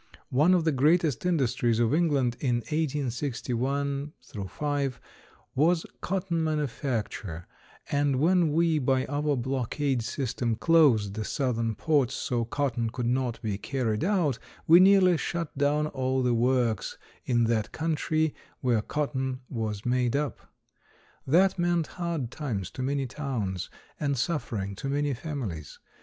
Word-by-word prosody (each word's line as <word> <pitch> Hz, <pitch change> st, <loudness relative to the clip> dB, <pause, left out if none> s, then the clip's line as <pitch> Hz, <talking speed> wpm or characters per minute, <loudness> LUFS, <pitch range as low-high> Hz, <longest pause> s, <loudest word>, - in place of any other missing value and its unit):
One 155 Hz, +8 st, +5 dB
of 175 Hz, -, +2 dB
the 160 Hz, -, +2 dB
greatest 155 Hz, +3 st, +2 dB
industries 125 Hz, -8 st, +1 dB
of 120 Hz, +2 st, +2 dB
England 145 Hz, -7 st, +2 dB
in 125 Hz, -4 st, +1 dB
1861 140 Hz, 0 st, -2 dB, 0.4 s
5 145 Hz, -4 st, -2 dB, 0.5 s
was 160 Hz, +4 st, +2 dB, 0.2 s
cotton 180 Hz, -3 st, -1 dB
manufacture, 120 Hz, -, -2 dB, 0.5 s
and 145 Hz, -1 st, +2 dB
when 165 Hz, +3 st, +3 dB
we, 165 Hz, 0 st, +2 dB
by 130 Hz, -1 st, +1 dB
our 145 Hz, 0 st, 0 dB
blockade 130 Hz, +1 st, -1 dB
system, 115 Hz, -1 st, -2 dB
closed 120 Hz, -, +4 dB
the 110 Hz, +1 st, -3 dB
southern 115 Hz, -2 st, -1 dB
ports 140 Hz, +1 st, +1 dB
so 120 Hz, -2 st, -1 dB
cotton 120 Hz, -2 st, -1 dB
could 125 Hz, +1 st, -4 dB
not 125 Hz, -1 st, 0 dB
be 105 Hz, -3 st, -2 dB
carried 120 Hz, -4 st, -1 dB
out, 170 Hz, -, +1 dB, 0.3 s
we 170 Hz, +2 st, +8 dB
nearly 185 Hz, -2 st, +6 dB
shut 170 Hz, 0 st, -3 dB
down 145 Hz, +2 st, +2 dB
all 130 Hz, -3 st, -1 dB
the 125 Hz, -1 st, +2 dB
works 120 Hz, -3 st, +1 dB, 0.3 s
in 120 Hz, -2 st, +2 dB
that 115 Hz, -2 st, 0 dB
country 160 Hz, -1 st, 0 dB, 0.3 s
where 120 Hz, -4 st, +2 dB
cotton 130 Hz, -1 st, -2 dB
was 110 Hz, -4 st, -3 dB
made 125 Hz, 0 st, +1 dB
up. 145 Hz, 0 st, -3 dB, 0.8 s
That 180 Hz, +6 st, +4 dB
meant 175 Hz, -2 st, +2 dB, 0.2 s
hard 165 Hz, -8 st, -2 dB
times 105 Hz, -, -4 dB
to -, -, -6 dB
many 135 Hz, +1 st, 0 dB
towns 120 Hz, -, -3 dB, 0.3 s
and 140 Hz, -2 st, 0 dB
suffering 115 Hz, -, -2 dB
to 135 Hz, -, -4 dB
many 145 Hz, 0 st, 0 dB
families. 120 Hz, -, -5 dB
135 Hz, 135 wpm, -28 LUFS, 120-150 Hz, 0.8 s, we